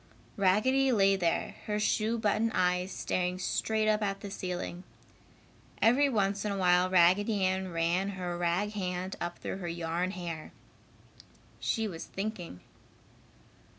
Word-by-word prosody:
Raggedy 255 +8 +3
lay 195 -4 +4
there, 175 -3 -1
her 210 0 0
shoe 215 +2 +1
button 220 +1 +1
eyes 180 +1 +1
staring 180 0 -1
straight 215 +3 0
up 215 0 +2
at 195 -1 -2
the 200 - -7
ceiling. 180 -1 -4 1.0
Every 265 +6 +4
once 200 -4 0
in 210 - -1
a 200 - -2
while 180 -1 +4
Raggedy 190 +3 +4
Ann 185 0 -1
ran 170 +4 0
her 175 -1 -3
rag 175 +4 0
hand 185 -2 -3
up 175 0 -3
through - - -5
her 180 -3 -5
yarn 170 +1 -2
hair. 170 -4 -6 1.1
She 225 -1 0
was 165 -5 -6
thinking. 195 - -5
190 Hz, 140 wpm, -30 LUFS, 180-210 Hz, 1.1 s, lay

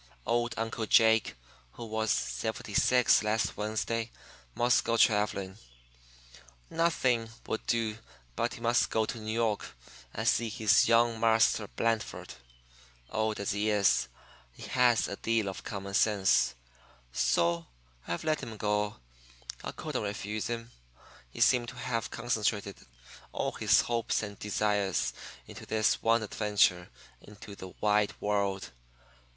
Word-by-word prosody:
Old 120 0 0
Uncle 115 0 -3
Jake, 110 - +4 0.4
who 120 - -8
was 110 0 -2
seventy 110 0 -2
six 125 +3 +4
last 110 +1 0
Wednesday, 110 +2 -2 0.5
must 120 0 +3
go 115 - 0
travelling. 105 -3 +1 1.1
Nothing 130 -9 +1 0.2
would 110 - -3
do 110 -2 0 0.4
but - - -1
he - - -12
must 120 +1 +2
go 110 -1 +1
to 115 - -5
New 110 0 -5
York 110 -2 0 0.5
and 110 - -4
see 120 -1 +2
his 105 -2 +3
"young 115 0 +3
Marster 110 -2 +3
Blandford." 115 +1 -2 0.8
Old 110 0 -1
as 100 - -1
he 105 +2 0
is, 100 - +3 0.5
he - - -12
has 125 -3 +3
a 100 - -6
deal 115 -2 0
of 95 - -6
common 100 -2 -6
sense, 95 - +3 0.6
so 85 +6 +1 0.4
I've 85 - -3
let 155 -1 0
him 110 -1 -7
go. 105 0 0 0.7
I - - -4
couldn't - - -4
refuse 105 +1 -3
him 115 0 -5 0.6
he - - -8
seemed 120 -2 +4
to - - -10
have 115 -2 -3
concentrated 105 - -2 0.5
all - - -1
his - - +3
hopes 115 -1 -1
and 100 -1 -7
desires 105 -2 0 0.3
into - - -11
this 110 -1 +1
one 115 0 +3
adventure 100 -4 +1 0.3
into 105 0 -12
the 95 - -9
wide 105 0 +1
world. 100 -2 -1
110 Hz, 135 wpm, -30 LUFS, 105-115 Hz, 1.1 s, Jake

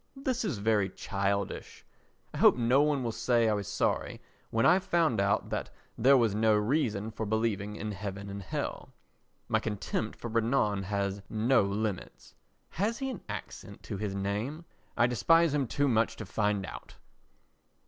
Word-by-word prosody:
This 260 -2 -2
is 175 - -2
very 105 -1 +2
childish. 100 0 -3 0.5
I - - -5
hope - - +6
no 125 +3 +4
one 145 -3 +1
will 115 - -1
say 115 0 +2
I 110 - +3
was 100 -2 -3
sorry - - -1 0.3
when 115 0 +1
I 180 +3 +6
found 170 - +1
out 100 0 0
that - - -2 0.3
there 135 +4 +5
was 115 -5 +2
no 110 +1 +3
reason 110 -2 0
for 110 - -5
believing 105 -1 -1
in 105 0 -4
heaven 100 0 -6
and 100 0 -6
hell. - - -5 0.5
My - - +2
contempt 110 0 -3
for - - -6
Renan 115 -3 +1
has 100 0 -2
no 115 +4 +3
limits. 100 - -3 0.4
(Has 215 +6 -1
he 270 -1 -3
an 225 - -7
accent - - -8
to - - -5
his 100 -1 -3
name? 105 +12 -3 0.3
I 120 - +5
despise 165 +7 +3
him 140 -3 +1
too 145 +5 +1
much 115 -3 +2
to 110 - -7
find 105 0 0
out.) - - -10
110 Hz, 170 wpm, -30 LUFS, 100-135 Hz, 0.5 s, hope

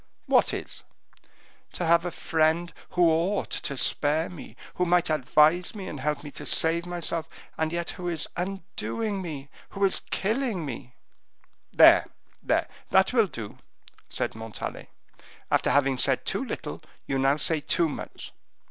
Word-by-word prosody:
"What - - +4
is?" - - -5 0.9
"To 175 - -2
have 170 +1 +4
a - - 0
friend 165 0 +1 0.2
who 175 -1 +6
ought 175 +6 0
to 140 -3 -3
spare 150 +5 +1
me, 180 - -10 0.2
who 180 - 0
might 175 -2 +3
advise 155 - +3
me 195 -3 -6
and 145 - -6
help 150 +2 -1
me 145 - -8
to - - -8
save 170 +2 +1
myself, 170 -2 -2 0.3
and 160 0 -1
yet 170 0 -2
who 180 -2 -6
is 165 -3 -2
undoing 195 +3 -3
me 145 -5 -7 0.3
is 195 -1 +2
killing 215 - -1
me." 125 -1 -7 0.8
"There, - - +7 0.3
there, - - +1 0.2
that 190 +5 +4
will 225 -4 +4
do," 120 - -8 0.5
said - - -2
Montalais; 110 -2 -7 0.6
"after - - +3
having 135 -2 +3
said - - +3
too - - 0
little, - - -5 0.2
you 135 - -1
now 135 +2 +3
say 160 0 +1
too 165 +3 +2
much. 150 - -7
165 Hz, 150 wpm, -27 LUFS, 145-180 Hz, 0.9 s, There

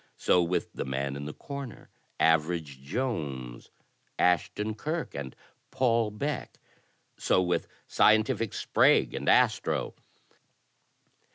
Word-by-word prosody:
So 90 - +3
with 85 +1 -1
The - - -3
Man 70 +1 -3
in 70 0 -6
the 75 - -6
Corner, 140 -5 -8 0.3
Average 80 -3 +1
Jones, 70 - -4 0.5
Ashton 95 +5 +1
Kirk 155 +9 -4
and 70 -3 -6 0.3
Paul 115 -3 +1
Beck. 140 +8 -4 0.6
So - - +2
with 90 -1 0 0.2
Scientific 110 0 +3
Sprague - - +3
and - - -2
Astro. - - +2
90 Hz, 105 wpm, -28 LUFS, 70-115 Hz, 0.6 s, So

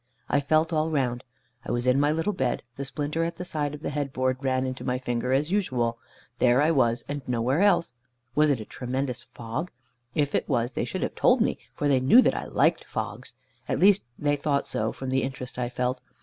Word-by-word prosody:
I 145 - +3
felt 155 +3 +2
all 155 0 +1
round. 130 -5 -1 0.4
I - - -4
was 120 0 -1
in 125 +2 +4
my 145 +1 +3
little 165 +7 0
bed, 130 -9 -1
the 140 - -4
splinter 150 +4 -2
at 170 0 -3
the 180 - -5
side 150 -4 -2
of 150 - -13
the - - -2
head 145 -1 -2
board 130 0 -1
ran 130 -1 +1
into 130 0 -4
my 125 - 0
finger 125 -1 -2
as 145 +5 +1
usual. 125 - 0 0.4
There 125 +1 +4
I 150 +3 +4
was, 120 -5 +2
and 145 0 -4
nowhere 125 +6 +1
else. 200 -7 +3 0.4
Was 150 0 +4
it 140 -4 +2
a 110 - -6
tremendous 125 +1 -3
fog? 120 +9 -5 0.5
If 145 -1 +1
it - - 0
was, 120 -2 0
they - - -1
should - - -3
have - - -2
told - - +4
me, - - +1 0.2
for 145 - 0
they 135 -2 +4
knew 180 - +7
that - - +2
I - - -3
liked - - +2
fogs. - - -5 0.3
At - - +1
least 200 +1 +5 0.2
they 145 -1 +1
thought 140 -1 0
so, 110 +1 -1
from 130 -1 -5
the 130 0 +2
interest 125 -1 -5
I 120 -1 -1
felt. 125 +1 -2
135 Hz, 225 wpm, -26 LUFS, 125-150 Hz, 0.5 s, knew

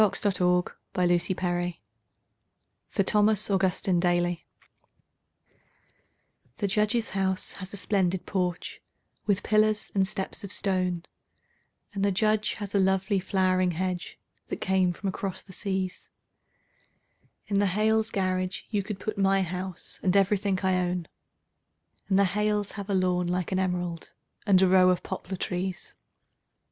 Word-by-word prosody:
The 200 -2 +2 0.2
Snowman 180 -1 +1 0.4
in 175 - +5
the 185 - -1
Yard 175 -1 0 1.1
(For 195 - +1
Thomas 210 +1 +3
Augustine 190 -1 +2
Daly) 175 -1 +1 2.1
The 210 - -1
Judge's 215 +3 +1
house 190 -1 -1
has 190 0 -7
a 205 - -6
splendid 190 -3 0
porch, 180 -3 -2 0.5
with 200 -2 +1
pillars 215 0 +2
and 195 -1 +2
steps 195 +2 -4
of 200 - -7
stone, 185 -4 0 0.9
And 200 -1 -2
the 200 - +3
Judge 215 +2 +2
has 205 -2 -6
a 200 - +3
lovely 190 +1 +2
flowering 185 -1 +1
hedge 180 +1 -3 0.3
that - - -4
came 185 -1 +2
from 185 +3 -5
across 190 0 -3
the 190 - -13
seas; 190 -1 -3 1.4
In 200 -1 0
the 205 - +3
Hales' 220 +3 +2
garage 185 -2 -1
you 205 -2 +1
could 200 0 -6
put 215 0 -4
my 195 0 +3
house 185 0 -4
and 185 +1 +3
everything 195 0 +2
I 190 -1 +2
own, 180 -2 -1 1.0
And 190 - +3
the 200 - +5
Hales 210 +1 0
have 200 -1 -7
a 200 - +1
lawn 180 -1 +1
like 180 0 -1
an 185 - +1
emerald 180 -2 -3 0.3
and 190 -2 +6
a - - +5
row 185 0 +6
of 180 -1 +1
poplar 190 0 -5
trees. 185 +1 -3
190 Hz, 145 wpm, -27 LUFS, 180-200 Hz, 2.1 s, and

